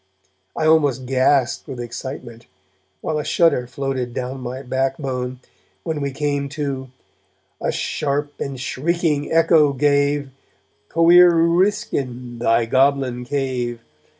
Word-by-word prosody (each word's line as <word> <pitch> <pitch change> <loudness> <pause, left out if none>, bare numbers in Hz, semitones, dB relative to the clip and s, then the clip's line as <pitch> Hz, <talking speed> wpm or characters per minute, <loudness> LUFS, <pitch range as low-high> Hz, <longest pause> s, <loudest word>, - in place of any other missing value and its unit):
I 155 - 0
almost 145 -5 +3
gasped 130 0 +1
with 130 - -7
excitement, 120 -1 -7 0.5
while 155 -1 -2
a - - -2
shudder 160 -8 +2
floated 130 -2 -3
down 130 +1 -4
my 125 +2 -6
backbone, 130 -1 -2 0.4
when 160 -3 -3
we 140 - -1
came 145 0 -2
to: 135 -3 -3 0.7
A - - 0
sharp 145 0 -2
and 135 -2 -4
shrieking 150 +2 -1
echo 160 -3 +4
gave, 140 0 +1 0.6
Coir 175 +1 +6
Uriskin, 165 - 0
thy 115 0 +2
goblin 130 0 +1
cave! 125 -3 -2
135 Hz, 115 wpm, -21 LUFS, 125-150 Hz, 0.7 s, Coir